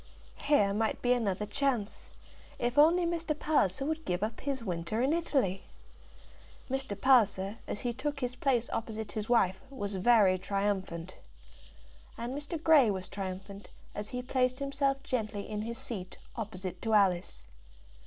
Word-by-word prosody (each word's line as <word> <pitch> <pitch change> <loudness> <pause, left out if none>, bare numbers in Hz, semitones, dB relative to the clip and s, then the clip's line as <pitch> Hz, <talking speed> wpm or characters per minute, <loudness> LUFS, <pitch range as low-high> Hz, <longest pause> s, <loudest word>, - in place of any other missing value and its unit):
Here 210 -9 +3
might 220 +2 0
be 245 0 +4
another 210 -4 0
chance, 235 -2 -1 0.5
if 240 +1 -1
only 340 +4 +6
Mr. 335 -3 -1
Palliser 275 - +1
could 315 +1 -2
give 180 - -1
up 220 +1 -3
his 275 -4 -2
winter 175 +2 -2
in 265 +5 +2
Italy! 270 - 0 1.1
Mr. 265 -7 -3
Palliser, 210 -5 +3
as - - -4
he 240 -1 -1
took 285 +3 -3
his 250 -1 -2
place 250 -3 +1
opposite 220 -2 -4
his 215 0 -4
wife, 190 -6 +3
was 205 -7 -5
very 195 -2 +5
triumphant. 190 -3 -2 1.0
And 235 +2 -4
Mr. 295 +3 -4
Grey 305 -7 +6
was 185 -2 -3
triumphant, 195 +1 -6 0.2
as 210 0 -5
he 250 0 -4
placed 255 0 +1
himself 275 0 0
gently 215 -6 -2
in 210 -1 -3
his 230 +2 -4
seat 225 -9 -6 0.2
opposite 185 -5 -5
to 220 -1 +1
Alice. 185 -4 +2
225 Hz, 150 wpm, -31 LUFS, 200-270 Hz, 1.1 s, only